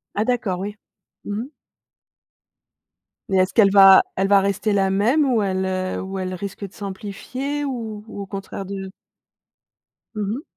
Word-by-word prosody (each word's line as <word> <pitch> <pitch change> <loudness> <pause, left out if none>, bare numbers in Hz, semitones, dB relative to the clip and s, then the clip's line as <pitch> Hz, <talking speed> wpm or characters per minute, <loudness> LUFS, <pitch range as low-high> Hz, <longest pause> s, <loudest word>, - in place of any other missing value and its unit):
Ah 210 - +1
d'accord, 230 -7 -1
oui. 205 +2 -5 0.5
Mmh 205 +1 -3
mh. 280 - -12 1.8
Mais 190 - +2
est-ce 185 +1 +2
qu'elle 200 -4 +5
va 195 -1 +8
elle 190 +1 +1
va 200 0 +6
rester 200 +2 0
la 195 -1 +2
même 235 +10 +3
ou 225 - +2
elle, 190 -1 0
heu, 185 0 -2
ou 190 0 -5
elle 185 0 -3
risque 200 +2 -6
de 190 - -21
s'amplifier 235 +9 -5
ou, 225 -5 -5
au 200 -1 -6
contraire 195 0 -6
de 195 0 -6 1.2
Mmh 210 -2 -2
mh. 270 - -6
200 Hz, 160 wpm, -22 LUFS, 190-215 Hz, 1.8 s, va